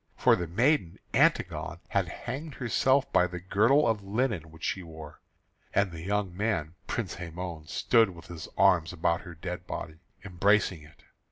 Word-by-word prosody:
For - - +5
the 85 - -3
maiden 120 - +2 0.2
Antigone - - +2
had - - +1
hanged 150 +2 -6
herself 130 +3 +2
by 90 - +5
the 90 0 -6
girdle 110 - +3
of 110 -2 +1
linen 100 - -1
which 80 +1 -15
she 95 - -1
wore, 80 -3 -11 0.5
and 100 -2 +3
the 80 -1 -8
young 100 0 -1
man 95 -6 -1
Prince 115 -8 -3
Hæmon 85 -2 -6
stood 115 -3 +3
with 85 -2 -11
his 80 -1 -8
arms 85 -2 +4
about 85 +1 +1
her 90 -2 -10
dead 90 +2 -6
body, 80 +1 -6 0.3
embracing 95 -2 +2
it. 75 0 -18
90 Hz, 165 wpm, -29 LUFS, 85-110 Hz, 0.5 s, For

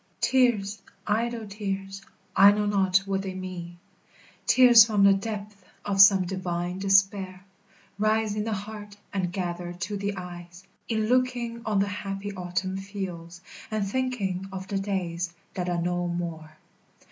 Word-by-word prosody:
Tears, 215 -6 +2 0.2
idle 230 +1 -1
tears, 195 -1 -5 0.3
I 200 +1 +8
know 210 0 0
not 195 -2 +3
what 195 -1 -1
they 190 -1 -5
mean, 180 -2 -7 0.7
Tears 245 -3 +8
from 210 -3 +1
the 200 0 +7
depth 205 0 -5 0.2
of 195 -1 +4
some 195 -2 +7
divine 180 -1 -3
despair 195 -1 +2 0.5
Rise 215 0 +1
in 210 - -1
the 225 - -3
heart, 205 0 -7 0.2
and 185 -3 -1
gather 175 -1 -4
to 195 +3 -4
the 200 0 -3
eyes, 175 0 -9 0.3
In 220 -2 0
looking 245 -1 0
on 215 -2 +1
the 200 +1 +2
happy 200 0 -5
autumn 185 +1 -3
fields, 180 -4 -7 0.3
And 215 -2 -1
thinking 200 -6 -2
of 190 0 -6
the 195 - -1
days 180 -3 -3 0.2
that 180 -1 -3
are 175 -1 0
no 175 +1 -1
more. 165 -3 -5
195 Hz, 145 wpm, -26 LUFS, 180-210 Hz, 0.7 s, I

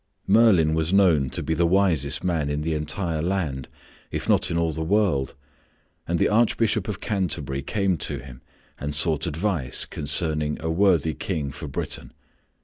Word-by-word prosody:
Merlin 95 -7 +4
was 80 +1 0
known 85 -9 +4
to - - -3
be 80 - -1
the 85 +1 +2
wisest 85 -7 +1
man 80 -5 0
in 75 +1 -2
the 80 +1 -1
entire 80 +2 -2
land, 80 -8 -2 0.4
if - - -4
not - - +3
in 85 - -1
all 85 -1 +1
the 80 +1 -5
world, 85 - +1 0.7
and 85 - 0
the - - +3
Archbishop 110 -1 +2
of 105 - -4
Canterbury 80 - -2
came 95 +3 0
to - - -3
him 65 -1 -11 0.4
and 75 +1 -4
sought 75 0 +2
advice 80 -5 -1
concerning 75 +1 0
a 80 +1 -2
worthy 85 -4 +2
King 75 -7 -3
for 75 +3 -8
Britain. 70 - -5
80 Hz, 165 wpm, -24 LUFS, 75-95 Hz, 0.7 s, Merlin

